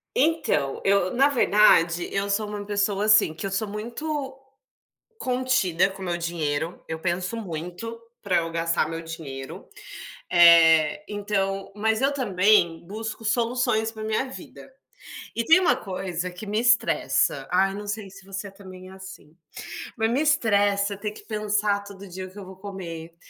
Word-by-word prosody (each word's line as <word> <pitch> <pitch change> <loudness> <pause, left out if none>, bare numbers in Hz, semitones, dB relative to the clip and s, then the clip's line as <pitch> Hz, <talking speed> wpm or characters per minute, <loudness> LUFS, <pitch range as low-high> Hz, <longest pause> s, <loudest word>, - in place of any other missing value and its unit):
Então, 260 - +1
eu 195 -2 +2
na 275 +3 +4
verdade, 175 -9 +4
eu 200 +1 -1
sou 210 +1 0
uma 205 -1 -6
pessoa 205 0 0
assim, 210 -7 +5
que 170 - -6
eu 195 - -3
sou 200 +2 -1
muito 265 +6 -5 0.8
contida 250 - +1
com 190 0 -10
o - - -4
meu 175 -1 -1
dinheiro. 165 -1 -3
Eu 160 0 -4
penso 180 +5 -2
muito 180 +4 -6 0.2
para 185 -5 +2
eu 165 0 -2
gastar 165 -1 0
meu 165 0 -5
dinheiro. 140 -5 -8 0.6
Eh, 165 -1 +6
então 195 -2 -2
mas 220 +2 0
eu 275 +1 +2
também 190 -8 +2
busco 220 +2 -6
soluções 230 0 +1
para 220 -1 -8
minha 220 +4 0
vida. 260 - -11 0.6
E 230 0 -1
tem 325 +3 +7
uma 300 -9 +3
coisa 185 -5 -4
que 180 +4 -9
me 210 +2 0
estressa. 240 -1 +2
Ai, 195 +2 +2
não 205 +1 -7
sei 205 -1 -4
se 195 0 -15
você 195 +1 -6
é - - -11
também 185 -2 -12
é - - -12
assim. 190 -4 -12 0.6
Mas 225 -1 +1
me 255 +5 +1
estressa 205 -9 +2
ter 210 +1 -5
que - - -13
pensar 210 -1 0
todo 200 -1 -11
dia 185 +1 -7
o 185 - -13
que 205 - -14
eu 200 - -8
vou 190 0 -12
comer, 170 -4 -8
200 Hz, 165 wpm, -25 LUFS, 180-220 Hz, 0.8 s, tem